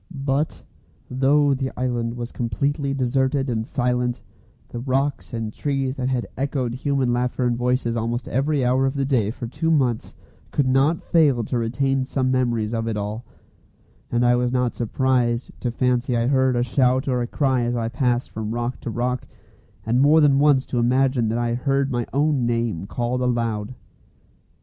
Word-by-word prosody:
But, 140 +3 -1 0.5
though 140 +2 +3
the 130 0 -2
island 120 -2 -1
was 120 0 -5
completely 140 +5 -1
deserted 135 +1 0
and 110 -1 -2
silent, 125 -1 -1 0.5
the 120 - -6
rocks 135 +3 -1
and 115 -3 -4
trees 135 -2 -2
that 130 0 -1
had 125 -2 -1
echoed 130 -3 -2
human 130 -1 0
laughter 125 +1 0
and 120 -1 +1
voices 125 -1 0
almost 115 +1 -2
every 135 +1 0
hour 130 +2 +2
of 135 - -2
the 140 -1 0
day 125 -7 +1
for 120 +2 -6
two 160 +7 -2
months 130 -8 0 0.3
could 145 - 0
not 135 +5 +2
fail 145 -8 +3
to 125 - -2
retain 135 +3 0
some 130 -1 -1
memories 120 -4 0
of 115 0 -2
it 110 -2 -2
all; 105 +3 -4 0.9
and 120 0 +2
I 120 0 +5
was 125 0 0
not 125 -1 0
surprised 125 0 0
to 125 - -2
fancy 125 0 0
I 115 - +1
heard 130 -1 +2
a 120 - +2
shout 130 +2 +1
or 125 -2 +1
a 120 - -2
cry 130 -1 +1
as 120 0 -1
I 115 -1 -1
passed 125 0 -1
from 110 +1 -4
rock 120 +1 -3
to - - -5
rock, 125 +2 -2 0.6
and 120 +3 +2
more 150 +3 +6
than 140 -3 +4
once 140 -2 +4
to 125 - -2
imagine 125 -1 +2
that 115 - -1
I 120 0 0
heard 135 +2 0
my 120 -2 -1
own 140 -2 +1
name 115 -6 -1
called 120 +3 -2
aloud. 115 -2 -1
125 Hz, 180 wpm, -23 LUFS, 120-135 Hz, 0.9 s, more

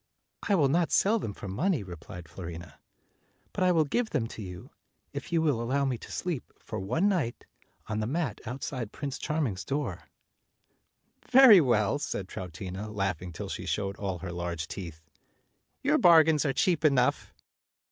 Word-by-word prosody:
"I 200 - +5
will 150 -6 +4
not 165 +4 +1
sell 220 +3 +3
them 110 - -4
for 100 - -9
money," 150 - 0
replied 90 -1 -9
Fiorina, 85 -2 -9 0.7
"but - - 0
I 180 - +5
will 160 -3 +3
give 235 +10 0
them 115 - 0
to 115 - -8
you, 90 -3 -9 0.4
if - - -6
you 165 -1 +2
will 140 -7 +1
allow 135 +4 0
rne 130 -4 -1
to - - -11
sleep, 170 -8 -3
for - - -6
one 125 - +1
night, 170 - -1 0.4
on 110 0 -3
the 110 - -1
mat 140 - -2
out 125 +4 -5
side 120 -6 -4
Prince 140 -2 -5
Charming's 145 - -1
door." 135 - -3 1.2
"Very 250 -7 +9
well," 120 -1 +2
said 105 -10 -3
Troutina, 95 +3 -6
laughing 95 -4 -2
till 80 - -6
she - - -5
showed 100 -1 -1
all 95 -3 -3
her 90 0 -6
large 85 -2 -4
teeth; 85 -4 -7 0.8
"your - - +3
bargains 160 -3 +6
are 135 - +1
cheap 170 -1 +1
enough." 135 -5 +2
120 Hz, 170 wpm, -29 LUFS, 95-160 Hz, 1.2 s, Very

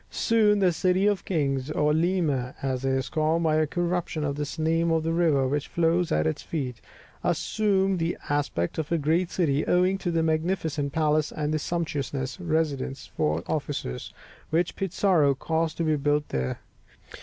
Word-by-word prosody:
Soon, 215 -2 +3
the 190 -3 +3
City 185 +3 +1
of 205 -2 +1
Kings 140 -6 0
(de 155 - -4
Los - - -7
Reyes), - - +1
or 150 0 +3
Lima, 160 -7 0
as 130 -1 -1
it 135 - +1
is 130 0 0
called 160 +2 +1
by 155 -1 +2
a 155 -1 +2
corruption 175 -1 -1
of 140 -1 -1
the 145 0 -3
name 165 +1 +2
of 165 -1 +1
the 165 +1 0
river 155 -6 +3
which 145 +2 -1
flows 170 +1 +1
at 75 0 +2
its 80 - -1
feet, 130 -8 -4 0.4
assumed 195 -3 +1
the 165 +1 -1
aspect 145 - -1
of 155 0 -3
a 170 - +3
great 165 +4 +1
city, 150 -5 +1
owing 185 +2 +3
to 180 - -2
the 165 -1 +1
magnificent 160 -3 -1
palace 155 0 +1
and 150 0 -2
the 155 - +1
sumptuous 145 -4 -3
residences 155 -6 -2
for 75 +2 0
officers, 140 - -3 0.4
which 165 +2 0
Pizarro 185 -6 +2
caused 160 +3 -1
to 170 - 0
be 155 -1 +2
built 145 +1 0
there. 65 -1 -2
160 Hz, 185 wpm, -26 LUFS, 140-175 Hz, 0.4 s, Soon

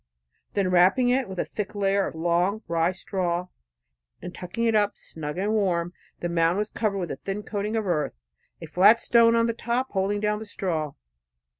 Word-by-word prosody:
Then 195 -3 +1
wrapping 190 +8 +4
it 255 +2 +4
about - - -14
with 190 - -7
a - - -3
thick 210 0 -5
layer 200 -1 +1
of - - -7
long 175 +6 0
rye 165 +1 +1
straw, 180 -1 -2 0.7
and 180 - -8
tucking 180 +6 -5
it 230 -1 +3
up 205 -1 +2
snug 150 0 -7
and 200 +3 0
warm, 175 -5 0 0.3
the 175 - -1
mound 170 +1 +2
was 210 +1 -2
covered, 210 -3 -1
with 175 -4 -3
a - - -4
thin 200 +6 -5
coating 210 +1 -3
of 220 -2 0
earth, 150 - -1 0.4
a 165 - -7
flat 195 +8 +5
stone 230 -1 +4
on 230 0 +3
the 230 - 0
top 240 +3 -2
holding 200 +1 0
down 210 0 0
the 220 - -7
straw. 165 -8 -3
195 Hz, 200 wpm, -25 LUFS, 175-215 Hz, 0.7 s, flat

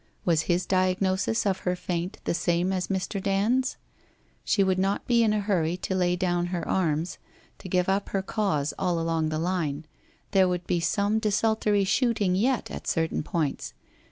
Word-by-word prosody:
Was 165 -3 +3
his 175 +1 +2
diagnosis 185 +3 +1
of 190 -2 +1
her 180 0 -1
faint 180 0 -3
the - - 0
same 175 +2 +1
as 185 -2 -1
Mr. 195 0 -2
Dand's? 215 +7 +1 0.7
She 200 - +2
would 190 -1 +1
not 195 +1 0
be 235 -1 +3
in 220 -2 +3
a 215 - +1
hurry 180 -4 0
to 190 - -3
lay 180 -1 +2
down 175 -1 0
her 175 -1 -3
arms, 165 -2 0 0.4
to 185 - -9
give 180 0 +1
up 195 +1 0
her 195 -1 -1
cause 190 -9 -1
all 175 -3 0
along 165 -1 0
the 155 - -2
line. 160 -3 -2 0.5
There 190 -2 +4
would 180 -1 -2
be 175 - 0
some 200 +5 +1
desultory 215 -1 +1
shooting 205 -2 +1
yet 240 +7 0
at - - -7
certain 160 -1 0
points. 150 - -3
185 Hz, 180 wpm, -26 LUFS, 175-200 Hz, 0.7 s, There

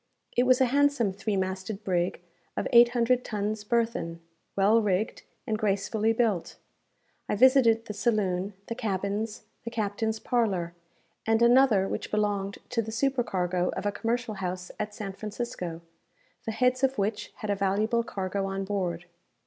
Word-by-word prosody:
It 245 +1 +3
was 255 -1 +5
a 260 - +5
handsome 285 -8 +3
three 200 +1 -2
masted 190 +2 -3
brig 175 -2 0 0.4
of - - 0
eight 235 0 +8
hundred 245 +1 +2
tons 210 0 -3
burthen, 225 -7 -1 0.4
well 210 +4 +4
rigged, 205 +1 0 0.2
and 215 -4 -1
gracefully 210 +2 +1
built. 220 -6 0 0.7
I - - +1
visited 230 -1 +5
the 210 - -5
saloon, 200 -3 0
the - - -4
cabins, 210 0 -2 0.2
the 230 - -4
captain's 220 0 -1
parlour, 200 -8 0 0.5
and 225 0 +3
another 235 -5 +5
which - - -4
belonged 205 -2 -1
to 240 -2 +1
the 220 0 -6
supercargo 195 -8 0
of - - -4
a 205 - +2
commercial 230 +2 -2
house 185 -2 -4
at 210 0 -3
San 195 -2 -5
Francisco, 200 -5 -5 0.7
the - - 0
heads 250 +3 +1
of 270 -1 +2
which 205 +2 -2
had 215 - -3
a - - +1
valuable 205 +4 +1
cargo 195 -3 -3
on 195 0 -3
board. 180 -4 -2
210 Hz, 155 wpm, -28 LUFS, 195-235 Hz, 0.7 s, eight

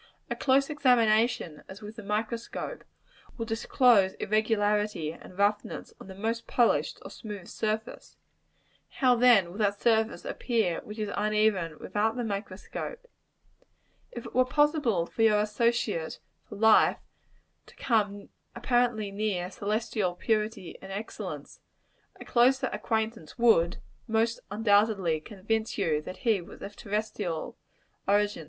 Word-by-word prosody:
A - - 0
close 275 +2 +2
examination, 230 - +2
as 200 +3 -11
with 210 +1 -8
the 225 - -8
microscope, 225 - -4 0.5
will 230 - -3
disclose 225 -3 +3
irregularity 210 -5 0
and 180 +2 -14
roughness 205 +1 -1
on - - -10
the 190 - -9
most 225 +4 -3
polished 240 -2 +2
or - - -9
smooth 205 -5 -8
surface: 220 +1 -4 0.7
how 255 -3 +3
then 230 -8 +5
will 200 - -9
that 205 -1 +1
surface 225 -1 +1
appear 220 -9 -1
which 210 - -9
is 210 -2 -3
uneven 210 -6 +1
without 220 +2 -1
the 245 - -2
microscope? 205 - -5 1.1
If 240 - -8
it - - -9
were 255 - +5
possible 275 - +2
for 225 - -5
your 215 -2 +5
associate 210 -5 0 0.3
for 210 - -8
life 220 +1 +5 0.7
to - - -17
come 205 -4 0 0.3
apparently 240 -4 +1
near 195 -3 -2
celestial 210 -3 -1
purity 215 -2 -2
and 190 - -9
excellence, 205 +3 -6 0.6
a - - -9
closer 260 +2 +3
acquaintance 220 -7 -2
would, 190 -8 +4 0.3
most 225 +1 +1
undoubtedly, 205 -5 +2
convince 220 +5 -3
you 160 -7 +1
that 185 - -10
he 220 -5 +3
was 185 +4 -12
of 205 +1 -8
terrestrial 205 -5 -3 0.5
origin. 205 +1 +2
215 Hz, 130 wpm, -28 LUFS, 200-230 Hz, 1.1 s, then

